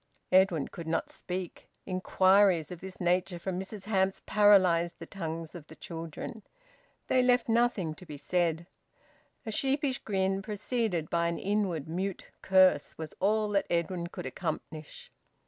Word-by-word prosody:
Edwin 185 -6 +4
could 170 -2 -9
not 160 - -1
speak. 180 -1 -6 0.2
Inquiries 185 -2 +3
of 180 - -7
this 190 0 -8
nature 180 0 +1
from 180 +1 -3
Mrs 195 +1 -7
Hamps 195 -2 0
paralysed 185 -5 +4
the - - -8
tongues 165 -3 -5
of 165 -4 -10
the 160 - -13
children. 165 +7 -7 0.6
They 255 - +3
left 250 0 +3
nothing 225 -8 +1
to 180 - -13
be 150 - -7
said. 170 +1 0 0.8
A 220 - -3
sheepish 270 +3 0
grin, 195 -1 0
preceded 210 -4 -2
by 170 0 +2
an 170 - -2
inward 190 -7 -1
mute 185 +3 -3 0.2
curse, 185 -6 +4
was 160 -1 -6
all 210 +2 +2
that 200 -1 +1
Edwin 170 +1 -1
could - - -8
accomplish. 155 +2 -6
185 Hz, 145 wpm, -30 LUFS, 170-200 Hz, 0.8 s, Edwin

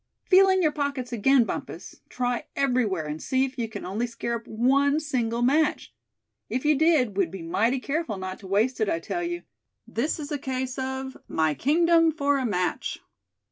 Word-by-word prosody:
Feel 385 +1 +6
in 375 -1 +3
your 310 - +3
pockets 280 -4 -3
again, 255 +3 +4
Bumpus; - - -6
try 245 -1 -2
everywhere, 245 - +1
and 150 +1 -5
see 260 0 +1
if 260 -1 -8
you 230 -2 -2
can 220 - -7
only 210 +7 -2
scare 235 0 -3
up 230 - -15
one 275 +6 +2
single 240 -6 -1
match. 295 +5 +1 0.6
If 255 +3 -2
you 305 - +5
did, 280 - +3
we'd 190 -4 +2
be 185 -1 -8
mighty 225 +10 +1
careful 275 - -2
not 185 0 -6
to 195 - -11
waste 220 +6 +1
it, 215 - +2
I - - +1
tell 345 - -4
you. 345 0 -3 0.4
This 290 +8 -2
is 300 0 -6
a 290 - -2
case 260 -1 -3
of 265 0 -4
'my 160 -1 +1
kingdom 330 - +3
for 285 -2 +1
a 255 - 0
match!'" 180 -4 -1
255 Hz, 190 wpm, -26 LUFS, 225-290 Hz, 0.6 s, Feel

